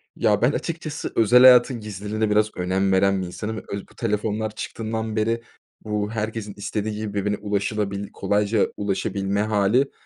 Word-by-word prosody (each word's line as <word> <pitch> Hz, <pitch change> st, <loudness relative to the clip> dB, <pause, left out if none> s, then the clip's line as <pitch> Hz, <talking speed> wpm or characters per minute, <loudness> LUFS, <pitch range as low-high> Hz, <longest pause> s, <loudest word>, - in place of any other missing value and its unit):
Ya, 105 Hz, -1 st, +2 dB
ben 125 Hz, +4 st, +4 dB
açıkçası 160 Hz, -2 st, -4 dB
özel 120 Hz, +3 st, +6 dB
hayatın 125 Hz, -1 st, +7 dB
gizliliğine 105 Hz, +1 st, -3 dB
biraz 105 Hz, +1 st, +2 dB
önem 95 Hz, +2 st, +1 dB
veren 95 Hz, 0 st, +3 dB
bir 90 Hz, -, -4 dB
insanım 110 Hz, +5 st, -5 dB
öz 100 Hz, -1 st, -5 dB
Bu -, -, -21 dB
telefonlar 110 Hz, -1 st, -2 dB
çıktığından 110 Hz, 0 st, -4 dB
beri, 115 Hz, +2 st, 0 dB, 0.4 s
bu 105 Hz, -1 st, -2 dB
herkesin 110 Hz, -2 st, -4 dB
istediği 105 Hz, +1 st, -3 dB
gibi 105 Hz, -1 st, -4 dB
birbirine 105 Hz, +1 st, -1 dB
ulaşılabil 100 Hz, -1 st, -2 dB
kolayca 105 Hz, +1 st, +1 dB
ulaşabilme 100 Hz, 0 st, -1 dB
hâli, 110 Hz, +5 st, +2 dB
105 Hz, 150 wpm, -23 LUFS, 100-110 Hz, 0.4 s, hayatın